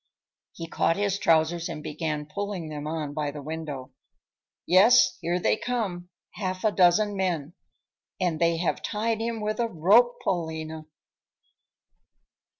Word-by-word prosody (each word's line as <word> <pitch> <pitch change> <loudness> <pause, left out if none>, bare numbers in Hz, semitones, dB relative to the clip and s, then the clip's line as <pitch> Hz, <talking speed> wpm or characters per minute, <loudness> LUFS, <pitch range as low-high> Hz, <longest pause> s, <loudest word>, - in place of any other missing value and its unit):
He 165 - -7
caught 165 +1 +1
his 200 -1 0
trousers 165 +1 +2
and 155 -2 -6
began 150 -1 -3
pulling 185 +1 -5
them 150 -1 -6
on 155 -2 -3
by 150 -1 -2
the 145 0 -8
window. 150 -4 -6 0.7
"Yes, 200 +7 +6
here 175 +1 0
they - - +2
come, 200 -9 -3 0.2
half 185 -2 -4
a 215 - +3
dozen 200 +3 +3
men. 175 -5 -2 0.7
And 175 -4 0
they 170 0 +3
have 170 +1 -1
tied 225 +1 -1
him 230 -1 -3
with 215 +1 -2
a 235 - +1
rope, 220 +7 +4
Paulina!" 160 -2 -3
175 Hz, 140 wpm, -26 LUFS, 155-205 Hz, 0.7 s, Yes